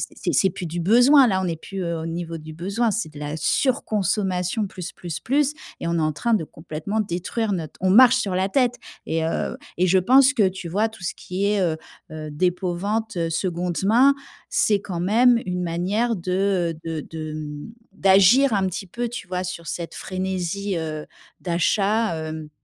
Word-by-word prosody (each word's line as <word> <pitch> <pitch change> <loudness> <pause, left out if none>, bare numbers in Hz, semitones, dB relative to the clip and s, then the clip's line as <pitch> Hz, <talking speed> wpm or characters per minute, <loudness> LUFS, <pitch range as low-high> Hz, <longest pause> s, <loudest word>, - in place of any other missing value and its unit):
c'est - - -2
c'est 190 - +4
plus 180 0 -6
du 170 +1 -3
besoin 245 - +6
là, 190 -4 +1
on - - -1
n'est 170 -2 -1
plus 190 +4 -7
au 170 -1 -3
niveau 165 0 -4
du 155 0 -10
besoin, 200 +8 -1
c'est 215 -3 -1
de 145 - -11
la 150 +1 -4
surconsommation 200 - 0
plus, 180 -2 -7
plus, 175 -3 -6
plus 285 +3 +1 0.3
et - - -4
on 170 - 0
est 165 - +1
en 155 0 +1
train 235 +10 0
de 205 -7 +2
complètement 155 +7 -5
détruire 205 +3 -2
notre 160 -5 -4
on 190 - +2
marche 250 +5 +7
sur 200 -7 -1
la 190 +1 +1
tête», 245 +1 +2 0.3
et 160 0 -1
heu, 165 - -2 0.2
et 185 +2 +3
je 190 - +4
pense 260 +8 +5
que, 215 -8 +3
tu 185 -2 -7
vois, 210 +6 +1
tout 220 -4 -14
ce 175 - -2
qui 185 +2 -3
est, 205 -1 +2
heu 165 -3 0 0.3
heu, 155 -1 -6
dépôt-vente, 185 +5 -1
seconde 175 +1 -2
main, 250 +7 +5 0.4
c'est 205 -2 +2
quand 180 -4 -5
même 235 +6 +4
une 180 0 -2
manière 190 +8 0
de, 185 -1 0
heu, 155 - -14 0.2
de - - -13
de, 155 -1 -6
hem, 150 +3 -7 0.2
d'agir 200 +8 +5
un 195 -2 +2
petit 190 +2 -5
peu, 240 +6 -3
tu 230 -5 -7
vois, 180 0 -2
sur 170 -2 -6
cette 170 -1 -5
frénésie, 190 +1 -3
heu, 155 -2 -4 0.3
d'achat, 195 +2 +1
heu, 155 -1 -7
185 Hz, 195 wpm, -23 LUFS, 170-215 Hz, 0.4 s, marche